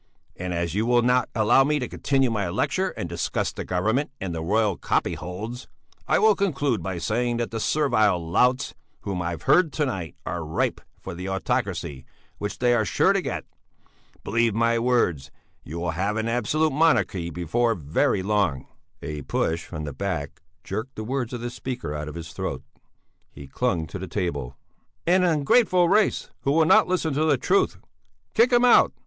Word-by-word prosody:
And 90 Hz, 0 st, -5 dB
as 85 Hz, -1 st, -2 dB
you 110 Hz, +4 st, 0 dB
will 120 Hz, -1 st, +4 dB
not 125 Hz, +1 st, +2 dB
allow 110 Hz, +4 st, +5 dB
me 150 Hz, +2 st, +1 dB
to 125 Hz, -4 st, -3 dB
continue 135 Hz, -1 st, +1 dB
my 100 Hz, -5 st, -1 dB
lecture -, -, 0 dB
and -, -, -3 dB
discuss -, -, -2 dB
the -, -, -5 dB
Government 110 Hz, +11 st, 0 dB
and 95 Hz, -3 st, -4 dB
the 80 Hz, -, -3 dB
royal 105 Hz, +3 st, +1 dB
copyholds, 105 Hz, +13 st, -3 dB, 0.4 s
I -, -, +3 dB
will 220 Hz, 0 st, +5 dB
conclude 145 Hz, -, 0 dB
by 95 Hz, +1 st, -4 dB
saying 120 Hz, +6 st, -1 dB
that 120 Hz, 0 st, -2 dB
the 115 Hz, -, -3 dB
servile 110 Hz, -8 st, +2 dB
louts 125 Hz, +10 st, +1 dB, 0.3 s
whom 95 Hz, -3 st, -3 dB
I 85 Hz, -, -2 dB
have 85 Hz, -, -6 dB
heard 175 Hz, -4 st, +4 dB
to 150 Hz, -, 0 dB
night 95 Hz, -, -4 dB
are 85 Hz, 0 st, -3 dB
ripe 80 Hz, +1 st, -1 dB, 0.2 s
for -, -, -6 dB
the 90 Hz, +2 st, -5 dB
autocracy 95 Hz, -, -2 dB, 0.4 s
which 105 Hz, 0 st, -4 dB
they 120 Hz, -1 st, +3 dB
are 115 Hz, -2 st, +3 dB
sure 100 Hz, -, +3 dB
to -, -, +1 dB
get. -, -, -4 dB, 0.8 s
Believe 115 Hz, -2 st, +1 dB
my 115 Hz, 0 st, +2 dB
words: 115 Hz, -, +1 dB, 0.3 s
You 80 Hz, -, -7 dB
will 85 Hz, 0 st, -1 dB
have 100 Hz, +6 st, -1 dB
an 110 Hz, +1 st, -1 dB
absolute 130 Hz, +7 st, +1 dB
monarchy 115 Hz, -, +2 dB
before 110 Hz, +8 st, 0 dB
very 80 Hz, +4 st, 0 dB
long!" 100 Hz, -9 st, 0 dB, 0.4 s
A 75 Hz, -1 st, -5 dB
push 80 Hz, +4 st, -1 dB
from 75 Hz, -, -6 dB
the 75 Hz, -2 st, -5 dB
back 95 Hz, -8 st, -4 dB, 0.2 s
jerked 110 Hz, +7 st, -5 dB
the 110 Hz, -, -5 dB
words 125 Hz, +1 st, -2 dB
of 120 Hz, -2 st, -5 dB
the 120 Hz, 0 st, -4 dB
speaker 125 Hz, -, -5 dB
out 75 Hz, 0 st, -4 dB
of 75 Hz, -, -7 dB
his 85 Hz, -1 st, -8 dB
throat. -, -, -4 dB, 0.7 s
He 70 Hz, -, -11 dB
clung 85 Hz, -, -1 dB
to 90 Hz, +5 st, -7 dB
the 95 Hz, -, -5 dB
table: 70 Hz, -9 st, -3 dB, 0.5 s
"And 180 Hz, +2 st, +4 dB
an 180 Hz, -, +4 dB
ungrateful 180 Hz, -, +4 dB
race 210 Hz, +1 st, +2 dB
who 140 Hz, -, 0 dB
will 160 Hz, +1 st, +4 dB
not -, -, +5 dB
listen 175 Hz, -4 st, 0 dB
to 155 Hz, +3 st, +1 dB
the 145 Hz, -3 st, +3 dB
truth...." 185 Hz, +10 st, +1 dB, 0.6 s
"Kick 240 Hz, +3 st, +4 dB
him 240 Hz, 0 st, +5 dB
out! 245 Hz, -, +6 dB
110 Hz, 190 wpm, -25 LUFS, 85-130 Hz, 0.8 s, out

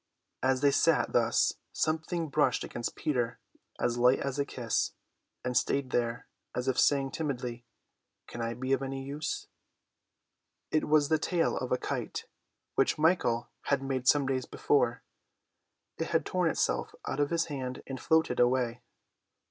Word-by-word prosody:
As 130 Hz, 0 st, +2 dB
they 145 Hz, -1 st, +5 dB
sat 155 Hz, +3 st, +3 dB
thus 115 Hz, -1 st, +3 dB, 0.2 s
something 160 Hz, +1 st, -1 dB
brushed 135 Hz, -, +2 dB
against 120 Hz, -, -4 dB
Peter 120 Hz, -6 st, -1 dB, 0.4 s
as 120 Hz, 0 st, 0 dB
light 125 Hz, +2 st, +5 dB
as 135 Hz, 0 st, -3 dB
a 140 Hz, -, +2 dB
kiss, 120 Hz, -5 st, -1 dB, 0.5 s
and 125 Hz, 0 st, -1 dB
stayed 140 Hz, 0 st, +1 dB
there, 115 Hz, -1 st, -1 dB, 0.3 s
as 125 Hz, -, -2 dB
if 130 Hz, -, +2 dB
saying 135 Hz, -2 st, +3 dB
timidly, 125 Hz, -6 st, -4 dB, 0.6 s
"Can 120 Hz, -, -7 dB
I 115 Hz, 0 st, -2 dB
be 130 Hz, +3 st, -1 dB
of 135 Hz, -, +1 dB
any 135 Hz, 0 st, -4 dB
use?" 145 Hz, +3 st, -4 dB, 1.3 s
It 155 Hz, -, +1 dB
was 150 Hz, -1 st, +4 dB
the 160 Hz, -, +3 dB
tail 170 Hz, +1 st, +1 dB
of 130 Hz, -, -3 dB
a 125 Hz, -, +3 dB
kite, -, -, -4 dB, 0.5 s
which -, -, +2 dB
Michael 155 Hz, -8 st, +2 dB
had 140 Hz, -1 st, +1 dB
made 130 Hz, -2 st, -2 dB
some 145 Hz, 0 st, +5 dB
days 130 Hz, -1 st, -1 dB
before. 125 Hz, -4 st, +1 dB, 1.0 s
It -, -, -1 dB
had -, -, +1 dB
torn -, -, +1 dB
itself -, -, 0 dB
out 135 Hz, -, -2 dB
of 145 Hz, 0 st, +2 dB
his 170 Hz, -1 st, +1 dB
hand 130 Hz, -4 st, -5 dB
and 135 Hz, -1 st, -6 dB
floated 160 Hz, -1 st, +2 dB
away. 125 Hz, -1 st, +2 dB
135 Hz, 155 wpm, -30 LUFS, 125-145 Hz, 1.3 s, they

